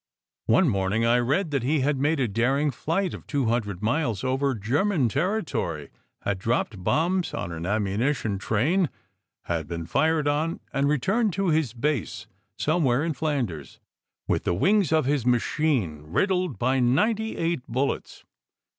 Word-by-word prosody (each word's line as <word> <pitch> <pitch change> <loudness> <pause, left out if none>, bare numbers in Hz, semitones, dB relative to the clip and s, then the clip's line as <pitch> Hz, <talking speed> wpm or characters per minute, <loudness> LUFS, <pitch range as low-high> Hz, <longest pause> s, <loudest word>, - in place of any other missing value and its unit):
One 140 +11 +4
morning 100 0 +1
I 120 +1 +4
read 145 +8 0
that 140 -3 0
he 140 +4 +1
had 140 0 +1
made 150 +2 +1
a 130 - +2
daring 135 +8 +1
flight 170 +8 -1
of - - -9
two 140 -4 0
hundred 110 -4 -1
miles 115 - 0
over 135 +1 0
German 135 - +1
territory, 140 - -2 0.3
had 100 -2 -1
dropped 110 -2 -1
bombs 175 - +1
on 85 - -4
an 85 +1 -5
ammunition 105 +2 0
train, 150 - +1 0.5
had 80 -3 -3
been 85 -1 -5
fired 155 - +1
on, 155 +3 0
and 140 0 +1
returned 195 - +1
to 195 0 0
his 155 -7 +1
base 120 -5 -2 0.3
"somewhere 150 -5 +1
in 165 - -1
Flanders" 125 - -3 0.5
with - - 0
the 85 - 0
wings 195 - +2
of 155 -3 +3
his 140 -2 +1
machine 120 - +1
riddled 180 - 0
by 130 +5 +1
ninety 210 - +1
eight 165 -3 0
bullets. 130 +4 -3
135 Hz, 155 wpm, -25 LUFS, 110-160 Hz, 0.5 s, One